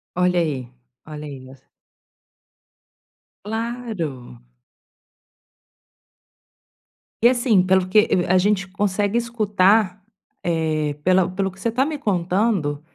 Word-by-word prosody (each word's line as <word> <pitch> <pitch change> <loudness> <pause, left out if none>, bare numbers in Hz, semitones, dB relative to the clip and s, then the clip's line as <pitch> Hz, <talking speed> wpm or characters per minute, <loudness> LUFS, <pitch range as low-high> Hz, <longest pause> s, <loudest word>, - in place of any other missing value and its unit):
Olha 180 0 +2
aí, 135 -7 -3 0.4
olha 150 -1 -8
aí 135 -3 -9
es 135 - -18 1.8
Claro. 215 - -5 2.8
E 235 - +7
assim, 240 -6 +3
pelo 185 0 +2
que 205 - +3
e 175 - +1
a 185 +1 +3
gente 195 0 +1
consegue 205 +2 0
escutar, 210 -4 +2 0.4
eh, 155 -3 -1
pela 185 +1 +3
pelo 190 +1 -2
que 195 - -18
você 230 - -2
tá 255 +3 +2
me 305 +1 -4
contando, 185 - 0
185 Hz, 105 wpm, -21 LUFS, 165-215 Hz, 2.8 s, E